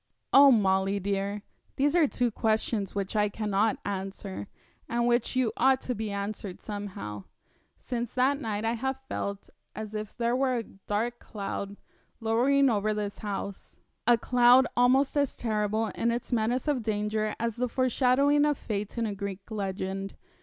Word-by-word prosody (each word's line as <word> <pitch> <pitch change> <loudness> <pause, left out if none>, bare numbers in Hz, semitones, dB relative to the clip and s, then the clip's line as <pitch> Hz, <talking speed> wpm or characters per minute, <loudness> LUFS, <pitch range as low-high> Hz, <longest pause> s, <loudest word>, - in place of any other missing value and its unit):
'Oh, 280 +1 +9
Molly 195 -3 +2
dear, 200 +1 -2 0.3
these 285 +4 +2
are 330 -4 +5
two 245 -2 0
questions 215 -2 0
which 200 +1 -3
I 210 -1 +3
cannot 210 +1 0
answer, 195 0 -5 0.4
and 235 0 +1
which 240 +1 +1
yet 255 -3 +2
ought 260 +1 +4
to 250 - -2
be 220 -1 -4
answered 200 -1 -4
somehow. 185 - -6 0.5
Since 240 -1 -4
that 270 +3 +2
night 215 -3 -2
I 225 - +1
have 265 +3 -2
felt 200 0 -4 0.2
as 215 0 -6
if 215 -1 -5
there 235 0 +1
were 260 -1 +1
a 235 - -1
dark 215 +4 -3
cloud 200 -1 -5 0.4
lowering 250 +5 +3
over 215 -2 +1
this 205 -1 -4
house 200 -2 -6 0.3
a 240 -1 +6
cloud 245 +2 +5
almost 260 +4 +4
as 285 -2 +1
terrible 215 -1 0
in 235 - 0
its 235 +2 -3
menace 240 +3 0
of 285 -4 +1
danger 215 0 -1
as 230 -1 -1
the 250 +1 0
forshadowing 260 +3 +3
of 295 -2 +2
fate 210 +1 -4
in 230 - 0
a 210 - -2
Greek 200 +1 -6
legend. 195 -1 -3
220 Hz, 160 wpm, -28 LUFS, 200-245 Hz, 0.5 s, Oh